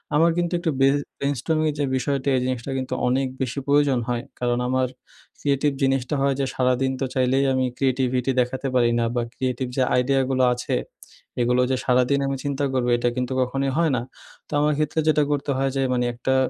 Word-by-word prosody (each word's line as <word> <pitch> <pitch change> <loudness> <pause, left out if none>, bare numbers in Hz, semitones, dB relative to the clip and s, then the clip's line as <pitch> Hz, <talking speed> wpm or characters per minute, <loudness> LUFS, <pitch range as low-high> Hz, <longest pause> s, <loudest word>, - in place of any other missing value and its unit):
আমার 165 +2 +4
কিন্তু 175 0 0
একটু 165 -2 0
ব্রে 135 0 +5 0.3
brainstorming 145 +3 0
এর - - -10
যে 145 - +2
বিষয়টা, 140 +1 -1
এই - - 0
জিনিসটা 130 +1 -3
কিন্তু 130 0 -3
অনেক 130 +2 +1
বেশি 130 +2 -2
প্রয়োজন 140 -3 +3
হয়। 120 -1 -1 0.2
কারণ 120 -1 0
আমার 130 0 +1 0.5
creative 140 0 +1
জিনিসটা 135 +1 +1
হয় 140 0 +2
যে 135 - +1
সারাদিন 130 +1 +1
তো - - +2
চাইলেই 130 +2 +2
আমি 130 0 +1
creativity 130 -1 +1
দেখাতে 130 +2 -2
পারি 120 -2 +4
না - - +1
বা, 120 - +1
creative 130 -1 -2
যে 130 - +4 0.2
idea 135 +1 +1
গুলো 130 0 +2
আছে, 125 - -2 0.7
এগুলো 125 +1 +2
যে - - +2
সারাদিন 125 +2 +3
আমি 135 0 -2
চিন্তা 140 0 -2
করবো 125 -1 +1
এটা 120 0 +1
কিন্তু 125 +1 -1
কখনোই 135 +2 -1
হয় 165 -3 +3
না। 115 - -1 0.5
তো - - -22
আমার 150 0 +2
ক্ষেত্রে 155 +1 0
যেটা 150 -1 +4
করতে 145 0 -1
হয় 135 0 +1
যে, - - +1
মানে 125 0 +1
একটা 130 +3 -1
130 Hz, 200 wpm, -23 LUFS, 125-140 Hz, 0.7 s, ব্রে